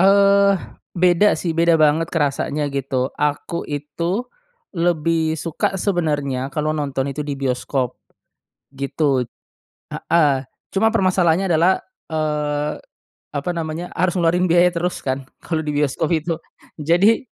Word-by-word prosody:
Eee, 200 +1 +5 0.4
beda 180 +3 +4
sih 170 - -1
beda 170 0 +4
banget 155 +2 +3
kerasanya 145 -1 0
gitu, 135 -1 -1
aku 150 +3 -1
itu 170 - -2 0.5
lebih 165 -2 +1
suka 165 +4 -2
sebenarnya 145 -9 -1
kalau 155 0 0
nonton 140 -2 -2
itu 150 - -6
di 140 -2 -3
bioskop. 130 -1 -2 0.7
Gitu, 140 -1 0 0.7
heeh, 150 -5 +2 0.4
cuma 220 +3 +3
permasalahannya 185 -1 +3
adalah, 170 +4 +4 0.4
eee, 150 -1 -1 0.6
apa 145 +3 -3
namanya, 165 +1 -4
harus 180 +1 +1
ngeluarin 175 +2 +2
biaya 175 +1 +5
terus 175 +1 -2
kan 135 0 -1 0.2
kalau 160 -2 -1
di 150 - -1
bioskop 150 +1 0
itu. 165 +1 0 0.4
Jadi 175 - +3
160 Hz, 120 wpm, -21 LUFS, 145-175 Hz, 0.7 s, Eee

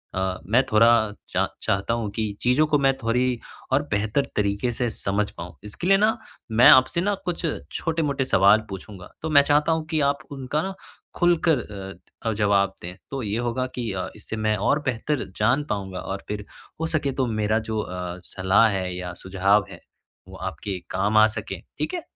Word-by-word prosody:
अ, 95 0 -1
मैं 120 +6 +4
थोड़ा 110 +2 +6 0.4
चा - - +1 0.2
चाहता 100 +4 0
हूँ 115 -3 -2
कि 110 -2 -1
चीज़ों 125 +5 +3
को 150 - +3
मैं 135 -1 +4
थोड़ी 125 +1 0 0.3
और 145 +3 +3
बेहतर 110 +7 +1
तरीक़े 100 +4 0
से 120 0 -1
समझ 100 -1 -1
पाऊँ। 85 0 -9
इसके 105 - -5
लिए 195 0 +6
ना 215 +3 +2 0.3
मैं 115 +3 +7
आपसे 130 +7 +5
ना 205 +2 +1
कुछ 175 -1 -2 0.3
छोटे-मोटे 150 -5 -1
सवाल 100 0 +5
पूछूँगा, 95 -1 -9
तो 160 - -3
मैं 145 -2 +7
चाहता 150 +3 +3
हूँ 160 -1 0
कि 155 - +1
आप 140 - -1
उनका 140 +2 -2
ना 195 0 -3 0.4
खुलकर 170 -5 +3
अ 100 +1 -9
अ, - - 0
जवाब 100 -2 +2
दें, 90 +1 -7 0.2
तो 135 -1 -3
ये 105 +2 -1
होगा 120 +1 -1
कि 120 -4 -2
अ, 95 -1 -3
इससे 110 +1 -7
मैं 110 0 +1
और 140 +9 +2
बेहतर 130 +3 -1
जान 120 +7 +2
पाऊँगा 95 -3 -3
और 95 0 -5
फिर 105 0 -4 0.4
हो 165 - 0
सके 145 -4 0
तो 130 -1 0 0.2
मेरा 110 +2 +2
जो 110 0 -3
अ, 90 -2 -5
सलाह 95 +6 +3
है 95 -2 -2
या 90 -1 -5
सुझाव 95 +1 +2
है - - -10 0.5
वो - - -11
आपके 95 -3 -4
काम 105 +3 +1
आ 110 0 +8
सके, 110 - -5 0.2
ठीक - - -2
है? 350 - -2
110 Hz, 190 wpm, -24 LUFS, 100-140 Hz, 0.5 s, आ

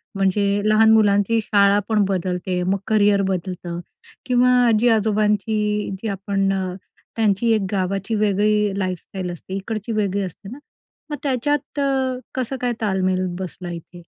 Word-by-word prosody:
म्हणजे 200 +1 +1
लहान 215 +1 +5
मुलांची 210 0 +3
शाळा 200 -1 +4
पण 215 -2 +3
बदलते, 180 -1 -2
मग 190 +2 +1
करिअर 205 -2 +3
बदलतं 180 -2 -4 0.5
किंवा 250 0 +3 0.2
आजी-आजोबांची 210 -2 +1
जी 225 - -3
आपण 195 -1 -1 0.7
त्यांची 220 +1 +2
एक 215 - +1
गावाची 195 +2 -1
वेगळी 210 -1 +1
लाईफस्टाईल 185 0 -4
असते. 175 +2 -9
इकडची 215 +3 -4
वेगळी 200 -2 0
असते 190 +2 -8
ना, 250 - -8 0.5
मग 295 - -3
त्याच्यात 290 +2 -1
अ, 265 -2 0 0.2
कसं 260 +1 -2
काय 245 -1 0
ताळमेळ 185 -3 0
बसला 180 -1 -6
इथे? 170 +1 -10
205 Hz, 130 wpm, -21 LUFS, 190-220 Hz, 0.7 s, लहान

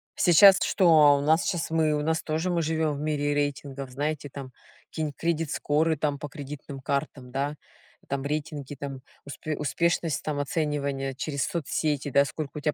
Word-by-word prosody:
Сейчас 190 +3 +7
что, 155 -8 +5
у - - -2
нас 160 +3 +3
сейчас 175 -5 -1
мы, 160 -1 +2
у 150 - 0
нас 160 +1 0
тоже 160 +3 -2
мы 170 -1 +1
живём 160 -2 0
в - - -7
мире 145 -1 0
рейтингов, 140 -2 -3
знаете 145 +2 -3
там 135 -1 -8 0.4
какие-то 155 -2 -3
кредит 165 -2 -1
скоры 160 +2 +1
там 145 -1 -1
по 150 - -5
кредитным 145 -2 -8
картам, 140 -2 -3
да. 140 +3 -2 0.5
Там 140 0 -2
рейтинги, 145 -1 -4
там 135 -1 -6 0.2
успе 150 +2 -5
успешность 165 +1 0
там 150 -2 -2
оценивания 140 -2 -1
через 140 +1 -2
соцсети, 150 -3 -1
да. 140 +1 +4
Сколько 150 0 -6
у - - -5
тя 150 +1 0
150 Hz, 175 wpm, -27 LUFS, 140-160 Hz, 0.5 s, Сейчас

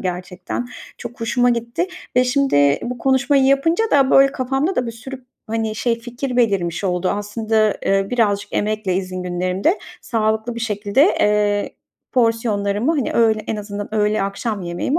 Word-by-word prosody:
gerçekten 180 +5 -4 0.3
çok 240 +1 -9
hoşuma 245 +2 +2
gitti. 235 +8 -1 0.3
Ve 250 - +5
şimdi 250 - +3
bu 245 0 -4
konuşmayı 270 +1 +2
yapınca 315 +10 +3
da, 275 -2 +4
böyle, 275 0 +6
kafamda 270 +8 -1
da 250 - 0
bir - - -3
sürü, 255 +3 -9 0.2
hani, 220 -1 -2
şey 230 +1 0
fikir 245 +2 -5
belirmiş 195 -6 +1
oldu. 180 0 0
Aslında, 215 +1 0
eee, 195 0 +2
birazcık 205 -4 0
emekle 210 -3 -1
izin 185 -1 -3
günlerimde 185 - 0 0.2
sağlıklı 220 +1 -1
bir 235 - -6
şekilde, 210 +2 +1 0.2
eee, 210 -1 +1 0.4
porsiyonlarımı, 225 0 +1
hani, 280 -7 -1
öğ 225 -2 +4
en 220 - -2
azından 205 +1 -6
öğle, 210 -1 +1
akşam 200 +1 -3
yemeğimi 175 - -1
220 Hz, 150 wpm, -20 LUFS, 200-250 Hz, 0.4 s, böyle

